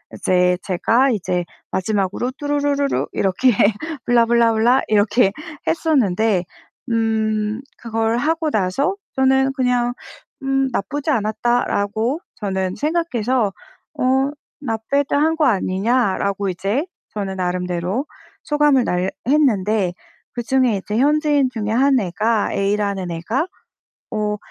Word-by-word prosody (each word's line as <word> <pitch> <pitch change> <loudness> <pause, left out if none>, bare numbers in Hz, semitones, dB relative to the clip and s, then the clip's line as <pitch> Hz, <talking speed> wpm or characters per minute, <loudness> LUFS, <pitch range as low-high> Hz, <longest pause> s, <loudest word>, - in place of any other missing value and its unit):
이제 180 -1 +2
제가 230 +8 +2
이제 180 -4 -1 0.2
마지막으로 200 +5 -1
뚜루루루루 285 -1 0
이렇게 200 +7 +2 0.6
blah 240 -1 +5
blah 235 -1 +3
blah 240 +4 +4
이렇게 210 0 +3 0.4
했었는데 220 - +2 0.5
음 220 0 0 0.2
그걸 225 0 -1
하고 315 +4 0
나서 270 - 0 0.2
저는 265 0 +3
그냥 250 -2 +1 0.5
'음 270 0 +1
나쁘지 285 +9 -2
않았다.'라고 225 +2 0 0.2
저는 190 -2 -2
생각해서 260 - 0 0.5
어' - - 0 0.6
not 220 -1 -1
bad 280 0 +1
한 315 +3 +2
거 315 -2 +2
아니냐?'라고 200 -2 +1
이제 200 - -1 0.3
저는 195 -2 -3
나름대로 180 - -2 0.4
소감을 295 -4 +3
날 180 +1 0 0.2
했는데 215 -10 +2 0.4
그중에 240 -2 +1
이제 210 +3 -4
현지인 290 -1 +3
중에 215 -2 -3
한 265 +2 +3
애가 210 +3 0
A라는 200 -2 -1
애가 220 - -2 0.7
어 210 -1 -1
225 Hz, 275 characters per minute, -20 LUFS, 200-270 Hz, 0.7 s, blah